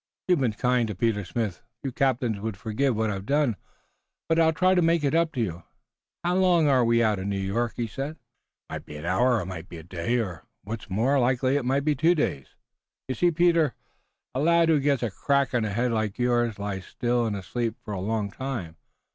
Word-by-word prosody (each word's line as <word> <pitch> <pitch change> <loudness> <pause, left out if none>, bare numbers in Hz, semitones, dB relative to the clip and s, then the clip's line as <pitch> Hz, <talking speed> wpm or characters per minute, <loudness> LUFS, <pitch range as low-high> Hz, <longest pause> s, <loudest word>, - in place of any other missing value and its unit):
"You've 180 -4 +3
been 125 -5 +1
kind 125 +1 +1
to 105 - -4
Peter 105 +1 0
Smith. 105 -2 -3 0.2
Few 135 - -2
captains 125 -4 0
would 110 -1 -4
forgive 115 +5 0
what 110 0 0
I've 100 +1 -5
done, 140 -5 +2 0.7
but 165 0 +2
I'll 160 -1 +5
try 185 +3 +3
to 180 - +3
make 165 -1 +2
it 140 - +1
up 165 0 +2
to 130 - -4
you. 85 -5 -3 0.6
How 175 +1 +1
long 175 -4 +4
are 130 -3 +4
we 115 0 +3
out 105 -3 +2
from 95 +2 -3
New 100 - -1
York?" 105 +5 -1
he 120 - -1
said. 135 +7 -4
"It - - -23 0.5
might - - -6
be 75 - -8
an 75 - -7
hour 120 +9 +3
or 110 - 0
it - - -5
might 90 -3 -7
be 85 - -8
a 80 - -10
day 90 +8 -2
or 95 -9 -3 0.2
what's 110 +2 -6
more 120 +9 +2
likely 130 +1 +2
it 145 -3 0
might 135 +2 +1
be 155 - +3
two 160 +6 +3
days. 70 - -1 0.6
You 130 - -1
see, 175 +6 +3
Peter, 170 -2 +3 0.6
a 130 - -2
lad 170 +2 +4
who 155 -2 +4
gets 140 -2 +1
a 115 - -1
crack 140 +6 +1
on 120 - +2
the 110 - -1
head 120 +4 0
like 110 -3 -1
yours 120 -2 +1
lies 100 -2 -4
still 120 -1 0
and 105 - -2
asleep 115 +4 -3
for 105 - -5
a 95 - -3
long 105 0 -1
time. 110 -11 -5
120 Hz, 230 wpm, -26 LUFS, 105-140 Hz, 0.7 s, I'll